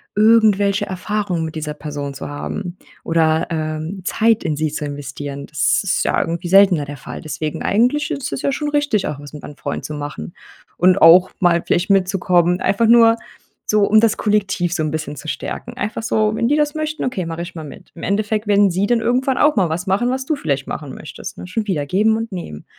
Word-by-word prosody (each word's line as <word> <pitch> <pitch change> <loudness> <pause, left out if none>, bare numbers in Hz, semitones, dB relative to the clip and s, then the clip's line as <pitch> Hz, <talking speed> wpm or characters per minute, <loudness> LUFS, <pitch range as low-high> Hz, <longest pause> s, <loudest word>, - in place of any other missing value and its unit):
irgendwelche 210 -2 +4
Erfahrungen 185 -2 -2
mit 160 - -7
dieser 155 -1 -4
Person 145 -2 -5
zu 135 - -7
haben. 175 +5 -5 0.3
Oder, 160 -1 +2
ähm, 155 +3 -4
Zeit 225 +4 +2
in 155 - -1
sie 155 +1 0
zu 150 - -4
investieren. 140 0 -6
Das 150 - +1
ist 195 -1 0
ja - - +1
irgendwie 170 +1 -3
seltener 190 -4 +5
der 145 0 -8
Fall. - - -8
Deswegen, 155 0 -4
eigentlich 250 +8 +1
ist 270 -2 -3
es - - -4
ja 280 - 0
schon 295 +2 -2
richtig, 290 -8 0
auch 145 - -5
was 145 0 -11
mit 150 - -9
deinen 145 - -9
Freunden - - -5
zu 150 - -6
machen 145 - -6 0.4
und 185 +2 +4
auch 175 +3 +7
mal 170 -2 +3
vielleicht 175 +3 0
mitzukommen, 185 -2 +2
einfach 210 +4 +1
nur 230 0 +6 0.5
so, 210 -1 +3
um 215 +1 +5
das 225 -2 +2
Kollektiv 195 -5 0
so 160 - -1
'n 155 - -2
bisschen 155 -1 -4
zu 150 +3 -7
stärken. 240 +9 -6
Einfach 220 -1 -3
so: 215 -2 +1
„Wenn 230 +1 0
die 295 - +3
das 295 0 0
möchten, 310 0 -3
okay, 225 -9 -2
mache 165 +1 -4
ich 175 - -10
mal 160 - -6
mit.“ 145 - -12
Im 170 - -10
Endeffekt 210 +1 -1
werden 200 -1 +4
sie 190 +4 0
dann 240 0 +2
irgendwann 250 +3 0
auch 295 0 +4
mal 190 -6 +2
was 175 +5 -3
machen, 200 +6 +1
was 260 +1 -2
du 310 - 0
vielleicht 140 - -2
machen 145 -4 -6
möchtest, 150 - -9
ne, - - -8
schon 210 +3 -3
wieder 155 -7 -1
Geben 215 +8 +2
und 225 0 -5
Nehmen. 75 - -7
185 Hz, 220 wpm, -19 LUFS, 155-220 Hz, 0.5 s, auch